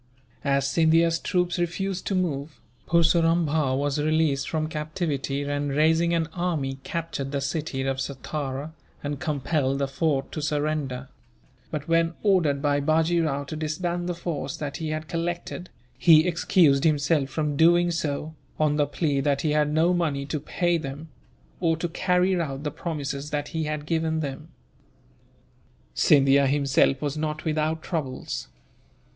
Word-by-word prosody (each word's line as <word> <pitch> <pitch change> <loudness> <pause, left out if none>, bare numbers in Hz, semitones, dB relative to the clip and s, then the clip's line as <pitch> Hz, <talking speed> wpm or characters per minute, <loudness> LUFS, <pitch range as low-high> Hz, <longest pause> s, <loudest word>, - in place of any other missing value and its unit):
As 140 -1 +1
Scindia's 165 +2 +3
troops 180 -1 0
refused 180 +2 -2
to 195 - 0
move, 150 -5 -2 0.3
Purseram 170 0 +3
Bhow 145 -3 +1
was 145 +1 0
released 155 -2 +1
from 155 -1 -1
captivity 150 -3 -2
and, 145 0 -2
raising 160 +4 +3
an 165 -1 +1
army, 155 -7 -2
captured 165 -5 -4
the 140 - -1
city 140 -1 -2
of 135 0 -1
Satara, 140 +2 -4 0.3
and 145 -1 -3
compelled 140 -2 0
the 140 0 0
fort 135 -1 -1
to 155 - -4
surrender; 145 -4 -2 0.6
but 150 -2 -5
when 165 0 +2
ordered 165 -9 +2
by 145 -1 +2
Bajee 160 +3 +2
Rao 140 -2 -1
to 150 +3 -7
disband 175 +3 -2
the 175 - -2
force 165 -5 -4
that 145 -2 -4
he 160 -1 -4
had 155 0 -3
collected, 175 +2 -4 0.3
he 160 -2 +7
excused 165 -5 +3
himself 150 -2 +2
from 150 0 -1
doing 175 +3 +4
so, 155 -1 -2 0.3
on 150 -1 +2
the 145 -1 +2
plea 145 -1 0
that 140 0 +1
he 155 - 0
had 150 0 +2
no 165 +4 +3
money 150 -6 0
to 145 +2 -3
pay 175 +3 0
them, 150 +2 -7 0.5
or 165 -2 +1
to 175 - -2
carry 180 +1 +1
out 140 -3 -4
the 150 - -2
promises 145 -3 -4
that 145 -1 -3
he 160 -1 -2
had 150 -1 -3
given 160 0 0
them. 145 +1 -5 1.5
Scindia 140 -1 +5
himself 140 0 +2
was 145 0 -1
not 155 0 -3
without 155 0 0
troubles. 150 -7 -4
155 Hz, 155 wpm, -25 LUFS, 140-165 Hz, 1.5 s, he